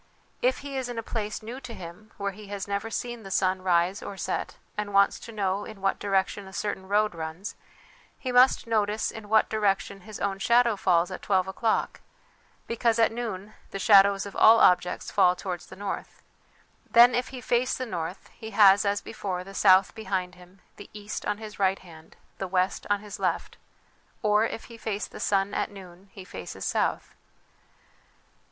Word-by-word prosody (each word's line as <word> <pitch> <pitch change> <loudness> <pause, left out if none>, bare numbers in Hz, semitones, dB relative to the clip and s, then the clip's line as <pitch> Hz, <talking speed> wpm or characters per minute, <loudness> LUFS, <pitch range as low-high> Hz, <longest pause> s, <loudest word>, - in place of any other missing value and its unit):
If 255 +1 +2
he 275 -1 -4
is 255 -2 -3
in 240 - -6
a 230 - -3
place 215 -1 -4
new 240 +4 -7
to 250 -3 -9
him 180 +4 -10
where 200 0 -2
he 210 +2 -12
has 200 -1 -5
never 200 +2 -2
seen 240 0 -4
the 195 - -10
sun 185 0 +1
rise 180 +1 +1
or 200 - -7
set - - -3 0.2
and 205 -1 -4
wants 200 0 +4
to 230 - -10
know 200 -2 -1
in 215 -2 -10
what 195 0 0
direction 195 0 -1
a 190 - -12
certain 190 -2 -3
road 210 +1 +2
runs, 165 +4 -6 0.6
he 255 - -4
must 250 +1 +5
notice 215 -1 0
in 215 -2 -10
what 220 0 +4
direction 200 -2 -1
his 215 +2 -9
own 195 +1 -2
shadow 235 +1 +4
falls 180 -2 +2
at 185 - -6
twelve 190 -2 +1
o'clock, 220 +3 -1 0.6
because 230 0 +1
at 225 -1 +4
noon 215 -3 -5 0.2
the - - -5
shadows 200 -1 +5
of 200 - -9
all 225 +1 +7
objects 180 0 +3
fall 180 0 +4
towards 180 -2 -5
the - - -11
north. 200 0 -6 0.7
Then 240 +1 +7
if 245 +1 0
he 260 - -8
face 245 +1 +1
the 255 - -3
north, 175 -3 -5
he 220 -1 -9
has, 200 -1 +7
as 200 0 +1
before, 185 -5 -5
the 195 +1 -11
south 190 -1 +5
behind 185 -4 -3
him, 180 +1 -18 0.2
the 205 - -11
east 210 0 -6
on 210 - 0
his 215 -1 -10
right 190 0 +2
hand, 160 -3 -15 0.2
the 190 - -3
west 185 +1 0
on 205 -1 +1
his 210 -1 -9
left; - - -1 0.7
or 210 +1 +4
if 225 - -6
he 230 -1 -13
face 210 -2 -3
the - - -11
sun 195 0 +1
at - - -1
noon, 190 -1 -13
he 190 - -11
faces 95 - -7
south. - - -1
200 Hz, 190 wpm, -27 LUFS, 190-220 Hz, 0.7 s, all